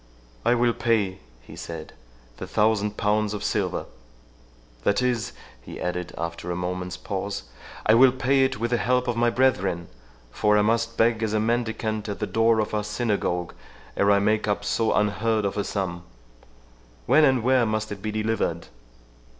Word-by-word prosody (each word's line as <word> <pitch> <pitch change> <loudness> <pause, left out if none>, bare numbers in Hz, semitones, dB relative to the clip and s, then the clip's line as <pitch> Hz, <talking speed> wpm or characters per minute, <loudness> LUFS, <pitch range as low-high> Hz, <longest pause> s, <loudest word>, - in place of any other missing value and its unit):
"I 120 - +3
will 120 0 +2
pay," 105 -6 0 0.2
he - - -12
said, 80 -2 -8 0.4
"the - - -6
thousand 105 -1 +1
pounds 105 0 +1
of 105 - -5
silver—That - - -4
is," 125 -4 0 0.3
he - - -9
added, 90 0 -3
after 85 +1 -4
a 90 - -1
moment's 90 +1 -4
pause, - - -4 0.4
"I 110 - +5
will 125 +3 +7
pay 135 +1 +2
it 130 -2 0
with 120 +1 -1
the 120 - +3
help 125 +1 +1
of 120 - 0
my 120 0 +3
brethren; 95 -10 +1 0.4
for 105 0 +2
I 105 - +4
must 115 +1 0
beg 115 0 +3
as 110 -1 -1
a 110 - +2
mendicant 110 -1 -1
at 100 - -3
the - - -2
door 115 0 +2
of 110 - -1
our 105 0 0
synagogue 105 -5 -1 0.4
ere 100 - +2
I 100 - +5
make 105 +2 +1
up 105 0 -1
so 110 +1 +1
unheard 105 +1 +1
of 100 - -1
a 100 - 0
sum.—When - - -3
and 130 -5 +3
where 130 -1 +3
must 110 0 -2
it 100 -1 -6
be 110 - -3
delivered?" 110 -6 -2
105 Hz, 170 wpm, -25 LUFS, 90-115 Hz, 0.4 s, will